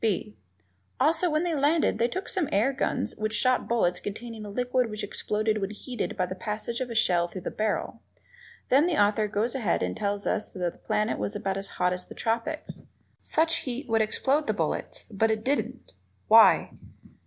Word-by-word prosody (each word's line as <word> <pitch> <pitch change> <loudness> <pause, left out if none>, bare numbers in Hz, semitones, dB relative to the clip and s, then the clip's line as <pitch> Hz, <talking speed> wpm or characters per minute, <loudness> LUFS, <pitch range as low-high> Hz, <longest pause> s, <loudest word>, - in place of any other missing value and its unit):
(b) 185 - 0 0.6
Also, 320 +6 +3
when 310 +1 +1
they 345 -2 0
landed 295 -5 +2
they 235 - +3
took 375 +9 -4
some 355 -7 -1
air 230 +8 +2
guns 265 - -1
which 215 +1 -1
shot 255 +4 +3
bullets 180 -7 +1
containing 225 +1 -6
a 205 - -7
liquid 250 +2 0
which 215 -1 -5
exploded 215 0 -1
when 195 - -1
heated 215 +1 -5
by 185 - +1
the 185 - -5
passage 215 +4 -4
of 255 - -2
the 230 - -6
shell 175 -5 +3
through 185 +1 -8
the - - -4
barrel; 215 -1 -2 0.7
then 280 +6 +5
the 345 - +1
author 210 +1 +3
goes 215 +3 -1
ahead 230 -10 0
and 90 0 -2
tells 205 0 -2
us 215 - -1
that 180 -3 -3
the - - -21
planet 210 - -1
was 105 0 -3
about 195 0 -2
as 195 0 -4
hot 180 0 +2
as 180 0 -5
the - - -12
tropics. 230 +7 -3 0.4
Such 325 +1 +1
heat 255 +2 -4
should 225 -1 +2
explode 275 +7 +1
the - - +1
bullets, - - -2
but 220 +2 +2
it 220 0 -1
didn't. 280 +2 -2 0.3
Why? - - +7
220 Hz, 200 wpm, -27 LUFS, 200-260 Hz, 0.7 s, Why